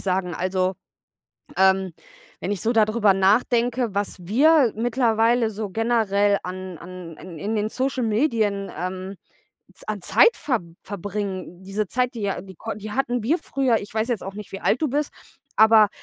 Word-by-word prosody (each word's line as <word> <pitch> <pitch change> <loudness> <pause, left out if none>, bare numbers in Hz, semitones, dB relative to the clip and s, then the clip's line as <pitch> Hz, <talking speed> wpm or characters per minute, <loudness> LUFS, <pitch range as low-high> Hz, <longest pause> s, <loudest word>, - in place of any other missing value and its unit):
sagen. 185 -2 -1
Also, 185 +1 0 0.8
ähm, 190 -1 +3 0.5
wenn - - -3
ich 195 - -3
so 230 - +1
da 220 -2 +5
drüber 215 -2 +3
nachdenke, 230 +3 +2
was 200 0 -1
wir 260 - +4
mittlerweile 230 -1 +2
so 210 -1 -5
generell 205 -3 +2
an 185 -2 -6
an 175 -2 -9
in 175 -4 -10
in 210 +7 -2
den 210 0 0
Social 260 +2 -2
Medien, 215 -4 0
ähm, 185 +2 -4 0.6
z - - -16
an 210 -2 -3
Zeit 470 - +5
ver 250 -7 -1 0.2
verbringen, 195 -2 -5
diese 200 +2 -2
Zeit, 250 +1 0
die 225 - -5
ja 200 -1 -1
die 190 -3 -13
kon 225 -2 -6
die 215 +1 -7
hatten 245 -2 -1
wir 305 +11 +1
früher 265 -4 +1
ich 205 +1 -10
weiß 220 +2 0
jetzt 235 -5 -1
auch 195 0 -6
nicht, 210 -1 -9
wie 195 - -6
alt - - +1
du 305 - +2
bist, 290 +3 -1 0.4
aber 220 -1 +7
210 Hz, 175 wpm, -23 LUFS, 190-235 Hz, 0.8 s, aber